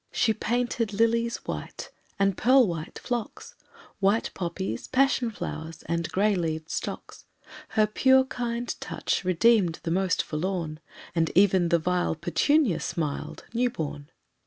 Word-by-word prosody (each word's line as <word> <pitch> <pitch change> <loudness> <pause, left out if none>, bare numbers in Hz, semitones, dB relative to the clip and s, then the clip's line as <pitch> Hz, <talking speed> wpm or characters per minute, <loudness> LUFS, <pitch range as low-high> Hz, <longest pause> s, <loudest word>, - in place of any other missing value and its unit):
She 220 - +2
painted 235 -1 -1
lilies 230 +2 +2
white, - - -6 0.3
and 195 -1 +2
pearl 255 +4 +5
white 165 -3 -5
phlox, 245 - -5 0.5
White 200 +3 +2
poppies, 175 - -4
passion 260 -2 +2
flowers 160 -6 -6
and 170 0 -2
gray 205 +2 +2
leaved 160 -3 -2
stocks. - - -5 0.5
Her 215 - +6
pure 260 +5 +4
kind 240 -2 -3
touch - - -2
redeemed 185 -1 +3
the 165 - -2
most 185 +1 +1
forlorn, 160 -1 -3 0.3
And 165 -2 +1
even 190 -3 +4
the 170 - +4
vile 175 0 0
petunia 225 - +2
smiled, 150 -4 -4
new 245 +1 +2
born. 150 - -5
195 Hz, 135 wpm, -27 LUFS, 170-235 Hz, 0.5 s, Her